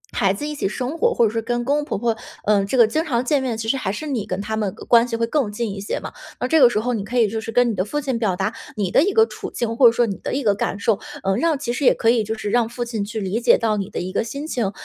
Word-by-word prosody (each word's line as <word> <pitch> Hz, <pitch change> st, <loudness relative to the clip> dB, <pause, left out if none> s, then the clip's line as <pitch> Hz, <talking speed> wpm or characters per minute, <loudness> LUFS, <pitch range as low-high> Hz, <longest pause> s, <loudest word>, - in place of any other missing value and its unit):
孩 195 Hz, -1 st, +3 dB
子 290 Hz, +9 st, -5 dB
一 300 Hz, -, -4 dB
起 285 Hz, -, -2 dB
生 255 Hz, +7 st, -4 dB
活， 475 Hz, 0 st, +3 dB
或 235 Hz, -, +4 dB
者 215 Hz, -, +1 dB
是 225 Hz, -, -1 dB
跟 240 Hz, +1 st, -2 dB
公 285 Hz, +3 st, +2 dB
公 295 Hz, -, -2 dB
婆 -, -, -3 dB
婆， 230 Hz, +2 st, 0 dB, 0.3 s
嗯， 200 Hz, -1 st, +2 dB
这 260 Hz, -, -1 dB
个 235 Hz, -, +8 dB
经 270 Hz, +9 st, -1 dB
常 250 Hz, -6 st, -1 dB
见 285 Hz, +1 st, +2 dB
面， 245 Hz, -4 st, -2 dB
其 225 Hz, 0 st, -4 dB
实 250 Hz, -, +2 dB
还 195 Hz, -, -2 dB
是 260 Hz, +10 st, -5 dB
你 250 Hz, -8 st, -2 dB
跟 185 Hz, -, -3 dB
他 220 Hz, +2 st, -3 dB
们 210 Hz, -4 st, -2 dB
个 -, -, -11 dB
关 235 Hz, 0 st, +5 dB
系 235 Hz, -, -3 dB
会 230 Hz, 0 st, 0 dB
更 245 Hz, -3 st, 0 dB
近 220 Hz, +1 st, -3 dB
一 195 Hz, -, -7 dB
些 205 Hz, -, -3 dB
嘛。 -, -, -8 dB, 0.3 s
那 250 Hz, -, -1 dB
这 315 Hz, +2 st, +4 dB
个 250 Hz, -, +8 dB
时 225 Hz, -, 0 dB
候 245 Hz, +3 st, -1 dB
你 210 Hz, -, -2 dB
可 245 Hz, +4 st, -4 dB
以 230 Hz, -, +4 dB
就 220 Hz, +2 st, -3 dB
是 225 Hz, -, -6 dB
跟 245 Hz, +1 st, +3 dB
你 -, -, -3 dB
的 185 Hz, -2 st, 0 dB
父 295 Hz, +9 st, -3 dB
亲 265 Hz, -5 st, -2 dB
表 205 Hz, -6 st, 0 dB
达 195 Hz, +4 st, -2 dB, 0.2 s
你 200 Hz, -5 st, -1 dB
的 -, -, +5 dB
一 395 Hz, +6 st, +2 dB
个 445 Hz, +2 st, +5 dB
处 -, -, -7 dB
境， 230 Hz, -1 st, -3 dB
或 245 Hz, 0 st, +7 dB
者 -, -, +6 dB
说 235 Hz, +1 st, +2 dB
你 200 Hz, -, -3 dB
的 -, -, -3 dB
一 275 Hz, -, -1 dB
个 205 Hz, -, +3 dB
感 200 Hz, 0 st, -3 dB
受， 205 Hz, -1 st, +1 dB, 0.2 s
嗯， 195 Hz, 0 st, +1 dB
让 325 Hz, 0 st, +2 dB
其 250 Hz, -4 st, -3 dB
实 265 Hz, -, -3 dB
也 -, -, +5 dB
可 230 Hz, 0 st, +3 dB
以 235 Hz, -2 st, +2 dB
就 220 Hz, +1 st, -3 dB
是， 210 Hz, -2 st, -4 dB
让 235 Hz, -1 st, +2 dB
父 240 Hz, +1 st, -4 dB
亲 225 Hz, -3 st, -3 dB
去 220 Hz, +2 st, -5 dB
理 200 Hz, +3 st, -2 dB
解 -, -, +5 dB
到 220 Hz, -2 st, 0 dB
你 195 Hz, -2 st, -3 dB
的 -, -, -4 dB
一 185 Hz, +1 st, -4 dB
个 -, -, +1 dB
心 280 Hz, +6 st, -6 dB
情。 235 Hz, -10 st, -1 dB
230 Hz, 370 characters per minute, -21 LUFS, 210-255 Hz, 0.3 s, 个